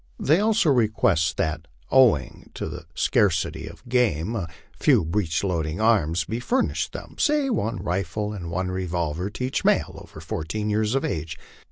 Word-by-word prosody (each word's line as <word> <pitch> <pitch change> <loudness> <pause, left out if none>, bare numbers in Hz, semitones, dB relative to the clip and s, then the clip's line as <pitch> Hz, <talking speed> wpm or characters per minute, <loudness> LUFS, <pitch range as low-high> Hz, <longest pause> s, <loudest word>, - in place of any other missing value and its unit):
They 155 +5 +3
also 210 -6 +3
request 110 - +2
that, 80 0 -2 0.2
owing 115 - +3
to - - -4
the 80 - -8
scarcity 100 - +1
of - - -12
game, 115 -5 +1
a 95 -7 -2 0.3
few - - +3
breech 85 -1 -1
loading 85 -2 -1
arms 90 -7 +2
be 115 - -3
furnished 250 - 0
them, - - -9
say 295 -3 +2
one 115 - -1
rifle 100 +4 -2
and 90 -5 -6
one 90 +2 -2
revolver 90 -1 -2
to 105 - -6
each 130 - -2
male - - +1
over - - -12
fourteen 105 +7 -3
years 110 +3 +1
of 135 - +1
age. 80 -3 -3
100 Hz, 165 wpm, -24 LUFS, 85-120 Hz, 0.3 s, They